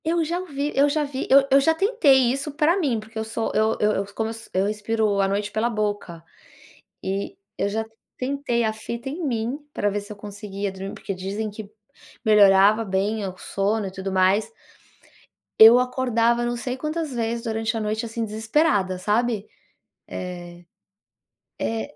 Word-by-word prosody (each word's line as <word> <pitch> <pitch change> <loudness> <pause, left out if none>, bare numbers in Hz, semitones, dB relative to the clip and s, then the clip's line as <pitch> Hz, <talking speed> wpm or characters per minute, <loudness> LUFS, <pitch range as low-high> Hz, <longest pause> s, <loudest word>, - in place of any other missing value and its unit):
Eu 335 +1 +1
já 340 +3 -2
ouvi 295 -5 -3
eu 280 +1 +4
já 305 +1 0
vi 280 -2 -4
eu 275 0 +6
eu 275 +1 +6
já 320 +4 +3
tentei 300 - +4
isso 275 +3 -3
para 305 +4 +2
mim, 275 - 0
porque 220 +1 -8
eu - - -1
sou 220 +1 -3
eu 220 +1 +2
eu 210 0 +3
eu 200 -1 -1
como 220 0 -1
eu - - -4
so 225 0 -10
eu 190 +1 +1
respiro 210 -1 0
à 195 - +2
noite 205 +1 -2
pela 220 +3 0
boca, 205 -6 -3 0.8
e 195 - -3 0.2
eu 200 - 0
já 220 +2 -2 0.3
tentei 260 -2 -1
a 220 -1 0
fita 235 +4 -6
em 325 +6 -5
mim 240 0 -1 0.2
para 205 - 0
ver 205 +1 -2
se 205 - -11
eu - - -17
conseguia 205 -1 -5
dormir 190 +1 -7
porque 195 - -5
dizem 200 +4 -4
que 210 0 -9 0.5
melhorava 205 0 +6
bem 200 +2 -1
o 185 0 -8
sono 200 +1 -1
e - - -6
tudo 190 +1 -5
mais. 190 - +2 1.1
Eu 225 +3 +10
acordava 240 -2 +1
não 240 0 -1
sei 250 +2 -4
quantas 305 +1 -3
vezes 230 0 -2
durante 225 0 -2
a - - -1
noite, 215 +2 -2
assim, 230 0 -3
desesperada, 220 - +1
sabe, 215 +2 0 0.6
eh 175 -1 -7 0.9
é, 225 +6 -3
220 Hz, 180 wpm, -23 LUFS, 205-260 Hz, 1.1 s, Eu